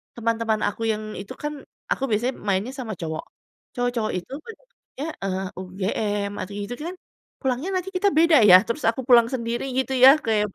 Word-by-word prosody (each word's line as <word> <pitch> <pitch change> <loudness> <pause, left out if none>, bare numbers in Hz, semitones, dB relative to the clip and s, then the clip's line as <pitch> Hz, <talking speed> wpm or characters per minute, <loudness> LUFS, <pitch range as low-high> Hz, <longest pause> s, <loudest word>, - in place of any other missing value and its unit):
teman-teman 230 -1 0
aku 225 - -7
yang 215 0 -3 0.2
itu 195 - -9
kan, 295 0 -2 0.4
aku - - 0
biasanya 240 +5 0
mainnya 200 +5 0
sama 230 -4 -4
cowok, 160 -1 -4 0.5
cowok-cowok 245 -3 -1
itu 180 - -12
banyaknya, 450 - -10 0.2
eee, 190 0 -2
UGM, 200 +2 -2
atau 200 - -6
gitu 205 +4 -5
kan, 360 - -6 0.5
pulangnya 265 +6 -1
nanti 365 +1 -6
kita 400 +2 +3
beda 325 -1 +5
ya, 180 - +11
terus 235 +6 -3
aku 230 +3 -2
pulang 235 -3 +7
sendiri 235 -1 -2
gitu 265 0 0
ya, 260 - +12 0.2
kayak 215 -2 +2
230 Hz, 170 wpm, -24 LUFS, 205-265 Hz, 0.5 s, ya